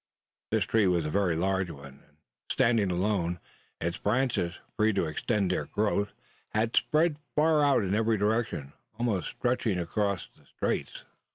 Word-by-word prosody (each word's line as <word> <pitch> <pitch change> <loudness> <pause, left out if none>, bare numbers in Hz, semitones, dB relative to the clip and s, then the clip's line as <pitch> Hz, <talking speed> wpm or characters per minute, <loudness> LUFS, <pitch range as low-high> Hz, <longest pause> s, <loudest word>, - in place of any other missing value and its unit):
This - - +1
tree 110 -3 +3
was 85 -3 +2
a 75 - -2
very 95 -3 +2
large 95 +1 0
one; 70 -3 -11
and 75 0 -31 0.3
standing 115 -5 +3
alone, 90 -1 0 0.4
its 85 +1 -2
branches, 105 -6 0 0.2
free 110 0 +3
to 95 - +1
extend 95 +5 0
their 90 - -1
growth, 105 -1 0 0.4
had 110 +2 +1
spread 155 0 +3 0.2
far 155 0 +4
out 140 -6 +4
in 95 0 -1
every 110 +1 +2
direction, 105 -9 -1 0.2
almost 115 -6 0
stretching 120 -5 0
across 95 +1 -1
the - - -24
straits. - - -3
100 Hz, 155 wpm, -29 LUFS, 90-115 Hz, 0.4 s, far